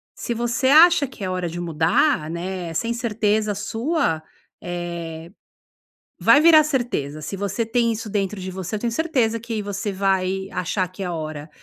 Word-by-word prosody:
se 235 - -3
você 240 +3 0
acha 320 +1 +7
que 225 -6 -8
é - - -2
hora 180 -2 -2
de 170 +2 -6
mudar, 165 - +1
né, 175 0 -4
sem 230 +9 -1
certeza 215 -3 0
sua, 225 - -1 0.4
eh, 170 -2 -5 0.9
vai 290 - +6
virar 310 -1 +7
certeza. 235 - -2
Se 155 +6 -5
você 200 +3 -2
tem 230 +1 +1
isso 220 -1 -5
dentro 200 -1 -2
de 185 0 -5
você, 185 +2 -5
eu 210 - -2
tenho 235 - -1
certeza 240 -6 +1
que 225 -1 -4
você 205 0 -3
vai 190 0 0
achar 185 +1 -1
que 185 +2 -7
é - - -3
a 175 - -3
hora 155 -1 -6
200 Hz, 175 wpm, -22 LUFS, 175-235 Hz, 0.9 s, acha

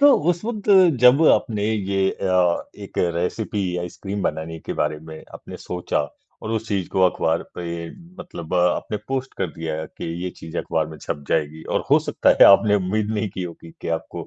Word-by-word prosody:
तो 285 0 +8 0.2
उस 175 +2 -3
वक़्त 215 -3 -2 0.3
जब 125 +5 +7
आपने 105 -5 +2
ये 95 -2 0
अ, 90 -2 +1
एक - - -8 0.2
रेसिपी 90 +1 -2
आइसक्रीम 95 +3 -5
बनाने 80 -1 -3
के - - -5
बारे 75 +1 0
में 80 0 -11
आपने - - -9
सोचा, 90 -4 -2 0.3
और 110 - -4
उस 110 0 -2
चीज़ 95 -4 -1
को 95 - 0
अखबार 85 -3 +2
पे 85 -1 -5 0.3
मतलब 85 +1 -7
आपने 90 +4 +1
पोस्ट 135 0 -3
कर - - +1
दिया 80 -2 -4
कि - - -10 0.2
ये 90 - -2
चीज़ 80 - -9
अखबार 80 -1 -1
में 80 0 -10
छप 70 - -5
जाएगी 80 0 -1
और - - 0
हो - - +7
सकता - - +3
है - - +11
आपने 105 +1 +6
उम्मीद 105 +3 -1
नहीं 110 -1 -1
की 95 - -3
होगी 85 -1 -8
कि - - -5
आपको 80 - -8
90 Hz, 190 wpm, -22 LUFS, 80-105 Hz, 0.3 s, है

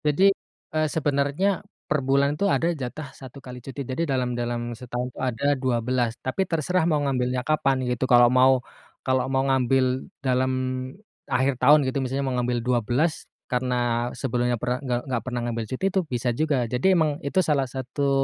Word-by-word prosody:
Jadi, 190 +7 +5 0.4
eee, 155 0 +2
sebenarnya 150 +6 0 0.2
perbulan 140 0 +2
itu 200 +7 0
ada 170 -2 +2
jatah 140 0 -6
1 130 0 -12
kali 125 -1 -8
cuti. 135 +2 -6
Jadi 130 +5 -3
dalam 125 -2 0
dalam, 120 0 -3
setahun 125 +1 -5
ada 130 +3 +1
12. 125 -2 0
Tapi 130 +9 -1
terserah 170 +1 +1
mau 155 - +3
ngambilnya 125 -2 0
kapan 135 -4 +1
gitu. 125 +1 -1
Kalau 120 -1 +7
mau 130 0 +5 0.4
kalau 130 -1 +2
mau 135 0 +2
ngambil 130 -1 +1 0.2
dalam 130 0 +2 0.8
akhir 130 +2 +2
tahun 145 +4 +7
gitu 130 - -3
misalnya 135 +2 -2
mau 130 - -1
ngambil 125 0 0
12 125 +6 0 0.2
karena 125 0 0 0.4
sebelumnya 125 -2 0
pernah 125 0 0
nggak 125 -3 -1
nggak 120 -3 0
pernah 125 -2 -3
ngambil 115 -1 -2
cuti 130 +9 -3
itu 195 - +3
bisa 120 +1 0
juga. 150 +2 +1 0.2
Jadi 125 - -1
emang 160 -3 +3 0.2
itu 165 - +1
salah 140 -3 +2
satu, 135 +2 -2
130 Hz, 170 wpm, -25 LUFS, 125-140 Hz, 0.8 s, Kalau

